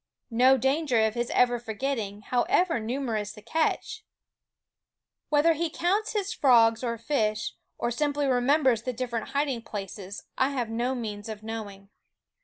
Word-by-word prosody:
No 255 +3 +5
danger 265 -3 +2
of 220 - 0
his 240 +1 -2
ever 245 -1 +3
forget 240 +4 -2
ting, 205 -1 -5
however 330 - +1
numerous 220 -3 -2
the 210 - -13
catch! 325 - -1 1.3
Whether 300 +3 +4
he 330 +1 -1
counts 385 +7 0
his 410 -1 -1
frogs 230 - +5
and 235 -2 -2
fish, 215 -5 -1 0.2
or 235 - -1
simply 290 +3 0
remem 270 +4 +3
bers 240 -4 +3
the 255 +1 -3
different 235 -2 -3
hiding 280 -4 0
places, 200 -2 -7 0.2
I 265 - +3
have 245 -5 -2
no 240 +3 -1
means 215 -3 -5
of 215 -1 -7
knowing. 205 -3 -7
245 Hz, 155 wpm, -27 LUFS, 220-285 Hz, 1.3 s, No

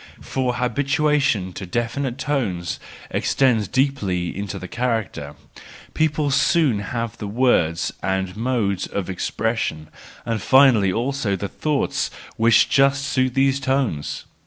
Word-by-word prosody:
For 125 -2 -2
habituation 140 - +1
to 95 - -7
definite 120 +5 -2
tones 110 - -2 0.3
extends 120 -7 +2
deeply 100 -11 0
into 100 0 -4
the 90 - -7
character:—people 120 - -3
soon 140 -4 +3
have 115 +2 -4
the 105 - -4
words 100 -8 +1
and 95 0 -2
modes 110 -5 -1
of 95 -1 -3
expression, 90 -5 -2 0.4
and 115 -2 -2
finally 130 -8 +5
also 120 -1 -1
the 100 +2 -4
thoughts 150 +6 -1 0.3
which 115 +1 +4
just 140 0 +3
suit 130 -2 0
these 135 0 +3
tones! 130 - -1
120 Hz, 115 wpm, -22 LUFS, 95-135 Hz, 0.4 s, finally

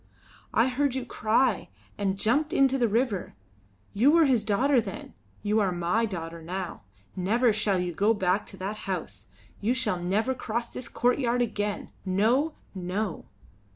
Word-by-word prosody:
I 230 - +3
heard 260 +1 0
you 260 -2 -2
cry 225 -1 +1 0.3
and 195 -1 -1
jumped 290 - +1
into 270 -4 +3
the 240 - +3
river. 220 - -1 0.6
You 235 +8 +4
were 330 +1 +6
his 250 -6 +3
daughter 245 +5 +3
then; - - -8 0.3
you 210 +1 +2
are 195 -3 +2
my 180 +6 +1
daughter 165 -4 -6
now. 180 +2 -5 0.3
Never 220 +6 +2
shall 205 -2 +1
you 180 -1 -2
go 205 +6 +3
back 190 +1 0
to 195 - -9
that 195 +3 -4
house; 110 - -4 0.3
you 230 +5 +1
shall 210 -8 0
never 210 +9 +1
cross 235 -1 -3
this 240 -2 -6
courtyard 245 0 +1
again. 210 -3 -3
No! 230 +11 +2 0.2
no!" 185 +1 -3
215 Hz, 155 wpm, -27 LUFS, 190-245 Hz, 0.6 s, were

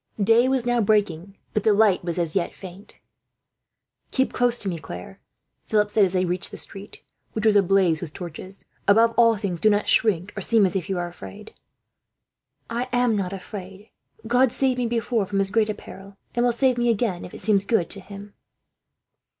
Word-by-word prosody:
Day 225 +5 +4
was 260 -2 0
now 245 -1 +2
breaking, 200 -3 0 0.2
but 215 - 0
the 215 - +4
light 205 -3 +3
was 170 -1 -3
as 170 -3 -1
yet 185 -3 -1
faint. 190 +1 -11 1.1
"Keep 265 0 0
close 245 -1 +2
to 200 - -6
me, 170 -3 -2
Claire," 95 - -9 0.5
Philip 210 -1 +1
said 210 -1 +4
as 190 -1 +1
they 185 0 +1
reached 180 +1 -1
the - - -9
street, 200 +1 -8 0.3
which 215 0 -3
was 215 -1 +4
ablaze 190 -4 +3
with 170 -4 -6
torches. 180 +3 -9 0.2
"Above 225 +3 +5
all 230 -2 +4
things 190 -4 -3
do 215 - +4
not 205 0 +1
shrink, 195 -4 +2
or 200 - -4
seem 220 +1 +3
as 185 - -2
if 190 -2 -3
you 190 - -1
were 175 -1 -2
afraid." 100 - -11 1.1
"I 240 +2 -3
am 245 -2 +2
not 190 -3 -2
afraid," 195 0 -8
she 210 +3 -21 0.3
said. - - -9
"God 250 +1 +4
saved 260 0 0
me 245 - 0
before 230 -3 -1
from 200 -1 -1
as 195 0 0
great 220 0 +2
a 210 - -2
peril, 195 +1 -13 0.2
and 240 - +1
will 245 - +3
save 250 +1 +1
me 240 0 +2
again, 215 -5 0
if - - -10
it - - -8
seems 200 -3 +2
good 200 -8 +1
to 200 - -2
Him." 200 +1 -11
205 Hz, 205 wpm, -23 LUFS, 185-230 Hz, 1.1 s, Above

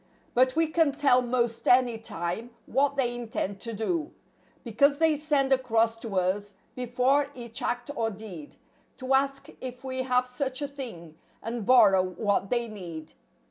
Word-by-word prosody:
But 255 +2 +3
we 325 0 +4
can 315 -2 +2
tell 275 -3 +4
'most 240 -2 -1
any 245 -2 +4
time 180 +2 -4 0.2
what 280 +2 +1
they 250 -3 0
intend 220 -4 -4
to 230 - -4
do, 305 - -2 0.5
Because 280 +5 +3
they 320 0 +3
send 285 -3 +1
across 230 -3 +2
to 225 -3 -6
us, 190 +2 0 0.2
before 255 +3 +1
each 235 -2 -6
act 245 +3 -2
or 225 -1 0
deed 195 -8 -10 0.4
To 260 0 -1
ask 275 0 +1
if 250 -1 -7
we 260 -1 -2
have 250 -1 +2
such 255 +1 -3
a - - -1
thing, 200 - -9 0.2
and 230 -2 -4
borrow 210 -7 +6
what 195 +2 -1
they 240 -1 0
^need. 170 -7 -8
245 Hz, 160 wpm, -27 LUFS, 220-270 Hz, 0.5 s, borrow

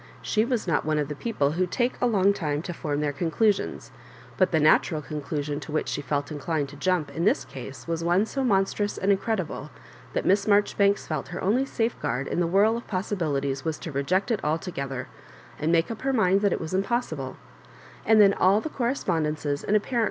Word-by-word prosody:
She 215 - +2
was 240 -3 -1
not 165 -4 +1
one 155 0 0
of 150 -1 -1
the 150 - -4
people 145 -7 0
who 180 +3 0
take 245 +7 0
a 245 - +4
long 200 -3 +3
time 150 -5 -2
to 175 - -5
form 150 -3 -2
their 145 -1 0
oondusions; 175 +8 0 0.4
but 185 - +3
the 160 - +2
natural 155 +1 +4
con 150 0 -5
clusion 145 0 -3
to 150 - -8
which 155 - -1
she - - -2
felt 145 +1 -2
inclined 150 0 -2
to 145 - -11
jump 155 -1 0
in 165 +4 -3
this 205 - +2
case 130 +2 -9
was 165 0 -2
one 175 +5 +3
so 270 +4 -3
monstrous 205 -2 +1
and 195 - +2
incredible 190 -7 -1 0.4
that - - -1
Miss 200 +2 +3
Maijoribanks 205 -1 +3
felt 155 -3 -3
her 175 - -6
only 235 +8 +2
safeguard 180 - -2
in - - -1
the 175 - +2
whirl 205 +6 +3
of 235 - -9
possibilities 150 -9 -2
was 160 -1 -2
to 165 - -7
reject 185 - 0
it 215 - -1
altogether, 145 -5 -3 0.5
and 155 +2 +1
make 165 +4 +2
up 225 - -6
her 270 0 0
mind 195 -4 +3
that 205 -2 +2
it - - 0
was 160 +2 -5
impossible; 190 - -1 0.7
and 220 0 +5
then 200 -1 +7
all 195 +2 +4
the 315 - -4
correspondences 160 - -1
and 210 - +1
apparent 235 +3 -2
175 Hz, 210 wpm, -26 LUFS, 150-205 Hz, 0.7 s, then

